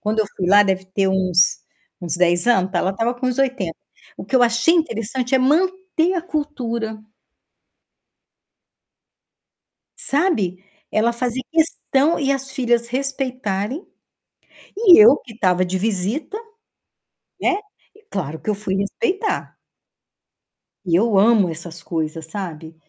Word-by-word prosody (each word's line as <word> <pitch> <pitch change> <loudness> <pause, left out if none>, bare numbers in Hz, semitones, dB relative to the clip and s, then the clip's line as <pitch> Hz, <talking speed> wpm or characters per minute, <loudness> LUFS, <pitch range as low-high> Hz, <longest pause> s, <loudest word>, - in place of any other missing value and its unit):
Quando 215 +1 -2
eu 210 - 0
fui 185 - -2
lá, 205 +1 +7
deve 190 -1 -1
ter 190 +1 0
uns 185 -1 +2 0.4
uns 175 -2 -2
10 175 +1 +2
anos, 190 -6 +3
então 180 -3 -1
ela 190 - 0
estava 230 +5 -1
com 255 +1 -4
uns 250 0 -1
80. 255 -11 -1 0.4
O - - -8
que 265 - +1
eu 245 - +4
achei 240 +8 +3
interessante 250 -4 -1
é - - +5
manter 365 +5 +1
a 355 - -1
cultura 245 - -4 3.0
sabe. 220 - 0 0.3
Ela 225 +2 +2
fazer 245 +1 -2
questão 320 -1 +1
e 275 -2 +1
as 270 0 -3
filhas 240 -3 0
respeitarem, 255 - -3 0.9
e 405 -5 +7
eu 240 +7 +7
que 235 - -14
estava 185 -4 +1
de 185 +1 -2
visita, 220 - -2 1.0
né, 375 - +2 0.6
claro 160 -5 -4
que - - -5
eu 210 - +1
fui 195 -2 -3
respeitar. 390 - -2 1.3
E 170 -2 +1
eu 215 +1 +2
amo 205 -2 +4
essas 170 +1 -8
coisas, 160 -1 -4
sabe, 165 -3 -7
225 Hz, 135 wpm, -20 LUFS, 190-270 Hz, 3.0 s, lá